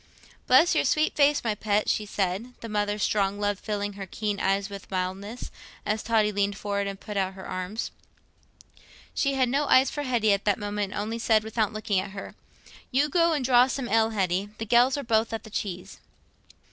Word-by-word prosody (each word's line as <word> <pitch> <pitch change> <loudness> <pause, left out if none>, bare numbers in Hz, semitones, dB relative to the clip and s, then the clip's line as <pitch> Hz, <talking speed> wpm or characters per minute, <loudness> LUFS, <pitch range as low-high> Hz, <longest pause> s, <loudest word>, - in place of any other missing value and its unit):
"Bless 265 +7 +6
your - - +2
sweet 310 0 +1
face, 290 0 +3
my 225 -2 0
pet," 210 0 0
she 210 - 0
said, 200 +5 -2
the 230 - -6
mother's 205 -1 -1
strong 200 -1 +1
love 205 -1 0
filling 205 -1 -3
her 195 -1 -7
keen 205 +1 -3
eyes 195 0 +1
with 200 -1 -9
mildness, 195 +5 -4 0.3
as 215 +1 0
Totty 220 -2 +2
leaned 200 -1 0
forward 200 -1 -2
and 195 -1 -5
put 210 -1 -6
out 190 -1 -1
her 190 - -9
arms. 185 +5 -4 1.2
She 275 -1 0
had 260 -1 +2
no 280 +4 +1
eyes 260 +1 +5
for 290 - -3
Hetty 240 -6 +2
at 200 - -1
that 205 -2 +2
moment, 205 -1 -3
and - - -3
only 225 +2 -4
said, 220 -2 +3
without 220 -1 -1
looking 215 -3 -1
at 190 +1 -5
her, 195 - -7 0.6
"You 280 +3 +2
go 335 +2 +3
and 285 -5 -1
draw 250 0 +6
some 265 -1 -3
ale, 225 0 +3
Hetty; 195 -2 -1
the 225 - -4
gells 245 +5 +4
are 285 - -3
both 225 -1 +1
at 225 - -4
the 220 - -12
cheese." 185 -4 -5
210 Hz, 205 wpm, -26 LUFS, 200-240 Hz, 1.2 s, Bless